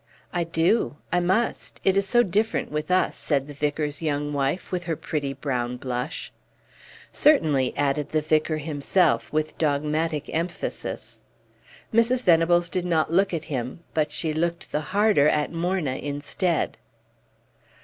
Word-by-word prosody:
"I 175 -2 0
do 165 +3 +1 0.2
I 180 - +4
must 190 +7 -1
it 190 - +3
is 195 0 +2
so 240 +3 +4
different 215 +3 0
with 150 +2 -3
us," 185 0 +2
said 140 -2 0
the 145 - -8
vicar's 145 +1 -2
young 145 -2 -1
wife, 140 +5 -1
with 180 -1 -2
her 165 -2 -1
pretty 145 -2 -3
brown 125 -3 -2
blush. 125 +3 -4 0.8
"Certainly," 155 - +3
added 145 +1 0
the 155 - +1
vicar 155 +1 +1
himself, 155 +4 +1
with 155 0 -2
dogmatic 150 0 0
emphasis. 170 +2 -4 0.7
Mrs. 240 +3 +3
Venables 175 0 +4
did 180 +1 -2
not 165 -3 +1
look 195 +2 +3
at 165 -3 -2
him, 130 +1 -4
but 155 -1 +1
she 155 +1 0
looked 170 +2 -2
the 150 - 0
harder 190 -4 +3
at 150 -1 0
Morna 165 -5 -1
instead. 145 +4 -2
155 Hz, 145 wpm, -25 LUFS, 145-180 Hz, 0.8 s, I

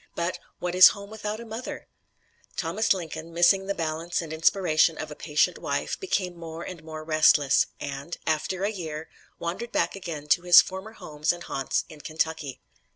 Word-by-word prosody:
But 170 +1 -2 0.2
"what 180 0 -3
is 185 0 +10
home 200 +1 -10
without 215 0 -4
a 235 - -8
mother?" 225 +3 -7 0.7
Thomas 195 +7 0
Lincoln, 165 -3 -2
missing 175 +3 +4
the 200 - -1
balance 165 +1 -2
and 160 -2 -5
inspiration 160 -1 +3
of 155 -1 -6
a - - -7
patient 150 -1 +1
wife, - - -2
became 190 - -1
more 165 0 -7
and 175 -4 -8
more 155 -1 -7
restless, 155 -3 +4
and, 140 +4 -5
after 160 +4 -1
a 205 - +1
year, 160 -6 -6 0.3
wandered 180 +8 -4
back - - 0
again 165 -6 -6
to 175 - +4
his 175 -1 +9
former 190 +4 -2
homes 150 -7 -2
and 175 0 -6
haunts 135 -4 -2
in 155 -2 -12
Kentucky. 155 -4 -3
170 Hz, 175 wpm, -26 LUFS, 155-190 Hz, 0.7 s, is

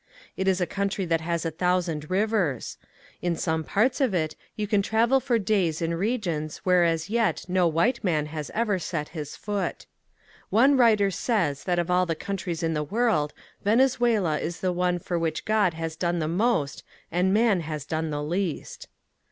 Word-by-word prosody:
It 190 - -2
is 190 -1 +3
a 180 - +1
country 195 +2 -2
that 165 -1 +1
has 170 0 -2
a 165 - -1
thousand 170 -2 -1
rivers. 190 - 0 0.4
In 175 -1 0
some 160 0 -1
parts 240 - +1
of 245 -8 +2
it 155 -2 -1 0.2
you 210 - -2
can 205 -1 +2
travel 230 +6 +3
for 245 -2 +1
days 190 -6 +1
in 165 0 -1
regions 170 -6 -2
where 180 -1 +4
as 165 -1 +1
yet 230 -1 +1
no 180 -1 +2
white 195 +10 +1
man 155 -6 +1
has 150 -1 -6
ever 215 -4 +1
set 155 -4 -3
his 150 -3 -6
foot. 205 -1 -3 0.6
One 265 +7 +5
writer 215 -6 +4
says 180 - -1
that 180 -1 +1
of 175 +1 0
all 180 0 +3
the 165 - 0
countries 180 -2 -4
in 165 0 +1
the 150 - -1
world 160 -5 +1 0.3
Venezuela 225 - +2
is 170 +1 -4
the 185 -1 0
one 180 0 +1
for 175 0 -3
which 160 -1 -2
God 210 -6 +2
has 165 0 -4
done 175 +1 -1
the 155 -2 -1
most 175 -4 0 0.3
and 180 +3 +2
man 215 -2 +3
has 155 -3 -5
done 160 +1 -2
the 145 -1 -3
least. 175 +1 -3
180 Hz, 185 wpm, -26 LUFS, 160-210 Hz, 0.6 s, One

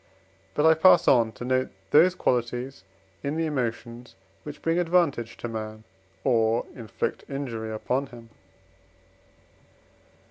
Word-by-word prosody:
But 150 - +2
I 160 - +7
pass 160 +4 +5
on 115 -4 +4
to 120 - -8
note 130 0 0 0.2
those 175 +5 +5
qualities 120 - -2 0.4
in 145 +2 -3
the 165 - 0
emotions, 120 -4 -4 0.3
which 150 -1 -10
bring 165 +1 +1
advantage 165 -9 +1
to - - -5
man, 110 -1 -6 0.4
or 115 -2 +2
inflict 110 -5 -4
injury 120 -6 -4
upon 125 +5 -2
him. 115 -3 -14
125 Hz, 120 wpm, -26 LUFS, 115-150 Hz, 0.4 s, I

